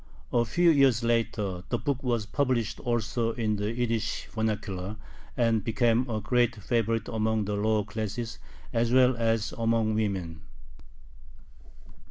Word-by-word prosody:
A 120 -1 +3
few 170 +8 +4
years 135 -6 +4
later 110 -6 0
the 120 - +1
book 140 +1 -2
was 120 -4 0
published 120 -2 0
also 120 -1 -1
in 110 -3 -1
the 105 +2 -1
Yiddish 115 -2 -1
vernacular, 105 -3 -2 0.4
and 115 -4 +2
became 120 +2 +1
a 110 -2 -1
great 120 +2 +1
favorite 115 +1 -1
among 110 -1 0
the 105 - -2
lower 105 +1 +1
classes 110 +2 -4 0.3
as 115 0 +1
well 130 0 +5
as 115 -1 0
among 115 -1 +2
women. 95 -7 -2
115 Hz, 135 wpm, -28 LUFS, 105-120 Hz, 0.4 s, well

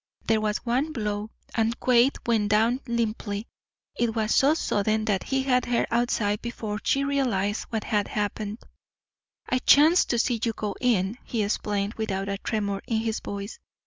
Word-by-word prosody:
There 220 -1 +2
was 210 -1 0
one 265 +6 0
blow, 210 -3 -3 0.2
and 225 +1 0
Quade 250 +2 +4
went 220 -3 +1
down 225 +4 +3
limply. 225 -3 -2 0.5
It 235 -1 0
was 220 -1 +1
so 285 +3 +4
sudden 215 -5 0
that 200 -4 +1
he 270 -1 -1
had 250 -2 +2
her 240 -1 +1
outside 225 -3 +1
before 220 -3 -4
she 275 - +2
realized 235 -8 0
what 220 -2 -2
had 205 -2 0
happened. 210 +1 -3 0.8
"I 255 - +1
chanced 310 +7 +5
to 240 - +1
see 235 0 +1
you 230 - +1
go 210 -2 -4
in," 225 -2 +1
he 225 -3 -1
explained, 205 0 -1
without 195 -3 -2
a 200 0 -3
tremor 200 -3 -2
in 225 - 0
his 225 -1 -2
voice. 200 - -6
220 Hz, 170 wpm, -26 LUFS, 205-240 Hz, 0.8 s, chanced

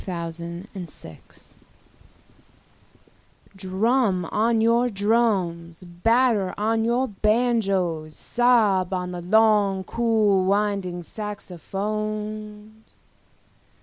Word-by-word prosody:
Jazz 170 -2 -5
Fantasia 170 - -9 2.4
DRUM 195 +1 0
on 225 +1 +2
your 235 +2 +3
drums, 195 -6 0
batter 210 +3 +1
on 225 +2 0
your 240 +3 +1
banjoes, 195 -8 0
sob 215 -7 +2
on 180 0 -3
the 175 -1 -6
long 205 0 +3
cool 215 -3 +1
winding 195 -3 -1
saxophones. 210 +2 -6
205 Hz, 75 wpm, -24 LUFS, 180-225 Hz, 2.4 s, your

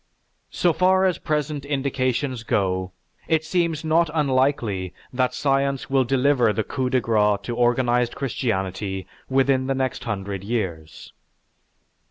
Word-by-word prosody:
So 175 -2 +1
far 185 +3 +3
as 185 -2 +1
present 150 -2 -2
indications 135 -2 -1
go, 95 -4 -1 0.4
it 160 -1 +1
seems 165 -3 0
not 165 +1 +3
unlikely 130 - 0 0.2
that 125 0 0
science 135 -1 0
will 135 -1 +4
deliver 130 -2 +3
the 110 +1 -1
coup 130 0 -2
de 130 - +2
grace 105 -3 +2
to 120 - -4
organized 120 0 +2
Christianity 95 -7 -2 0.2
within 130 0 +2
the 135 - 0
next 130 -1 -2
hundred 100 -3 -4
years." 95 -8 -4
130 Hz, 130 wpm, -23 LUFS, 110-140 Hz, 0.4 s, will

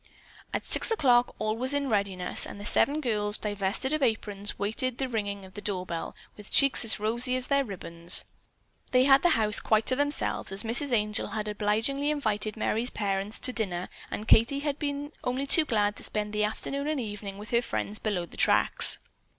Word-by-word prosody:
At - - -3
six - - +3
o'clock 250 - +2
all 215 0 -2
was 260 +4 +4
in 285 -1 -1
readiness, 200 -5 0
and - - -10
the 205 - -8
seven 290 +7 +2
girls, 210 -5 -1
divested 205 +6 -2
of 310 - -1
aprons, 210 -4 -2
waited 230 +5 -1
the 265 - -2
ringing 205 -4 -4
of 185 - -15
the 205 - -8
door 190 -3 -2
bell 170 -2 -6 0.2
with 210 -1 -9
cheeks 275 -3 +4
as 220 -2 -2
rosy 240 +4 0
as 255 0 -3
their 280 0 +3
ribbons. 175 -5 +2 0.6
They 255 0 +3
had 270 0 +5
the 350 - +3
house 215 -2 +5
quite 220 0 +1
to 255 - +1
themselves, 285 -7 0
as 195 +3 -1
Mrs. 255 +5 0
Angel 210 -3 -1
had 215 -1 -5
obligingly 220 +7 -1
invited 215 -7 -2
Merry's 225 +2 0
parents 200 0 -2
to 255 - +1
dinner 185 -6 -3 0.2
and 215 - -6
Katie 235 +6 +4
had 290 -1 -3
been 285 0 -4
only 255 +2 -2
too 310 +3 +6
glad 210 -5 0
to - - -7
spend 210 0 -4
the 210 0 +1
afternoon 275 +6 -4
and 305 -2 -1
evening 205 -3 -6
with 210 +1 -10
her 235 0 +3
friends 215 -3 -4
below 195 -5 -2
the - - -13
tracks. - - +3
220 Hz, 200 wpm, -27 LUFS, 205-265 Hz, 0.6 s, too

